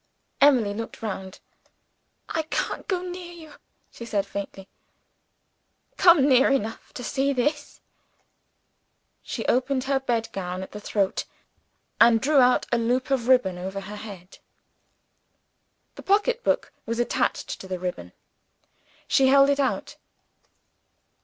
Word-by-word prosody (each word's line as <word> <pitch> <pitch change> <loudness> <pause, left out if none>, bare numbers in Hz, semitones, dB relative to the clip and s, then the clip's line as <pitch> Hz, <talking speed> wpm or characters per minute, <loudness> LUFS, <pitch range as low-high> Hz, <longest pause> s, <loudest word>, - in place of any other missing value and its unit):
Emily 250 -8 +5
looked 225 +1 -7
round. 190 -3 -5 0.9
"I 320 - -1
can't - - -3
go 370 -3 -1
near 355 -1 -7
you," 320 -3 -13 0.4
she - - -10
said, 210 -4 -1
faintly. 195 -1 -7 1.3
"Come 335 -6 +6
near 265 -1 +5
enough 225 -5 -2
to 250 - -7
see 275 +3 0
this." 290 +3 -2 1.4
She - - -5
opened 260 +1 +1
her 275 0 +1
bed 235 -4 -1
gown 185 -1 -4
at - - -10
the 210 - -8
throat, 200 -2 -1 0.7
and 230 -1 +6
drew 285 +4 +3
up 250 -1 +4
a 240 - +2
loop 250 +3 0
of 250 -3 0
ribbon 220 -9 +3
over 190 +2 -5
her 205 +2 -8
head. 195 -4 -11 1.5
'The - - -11
pocketbook 430 +5 +1
was 230 0 -2
attached 240 - -1
to 190 - -10
the 185 -1 -3
ribbon. 175 - -5 1.0
She 270 - +4
held 275 +1 +6
it 280 - 0
out. 270 -2 -1
245 Hz, 130 wpm, -25 LUFS, 200-280 Hz, 1.5 s, Come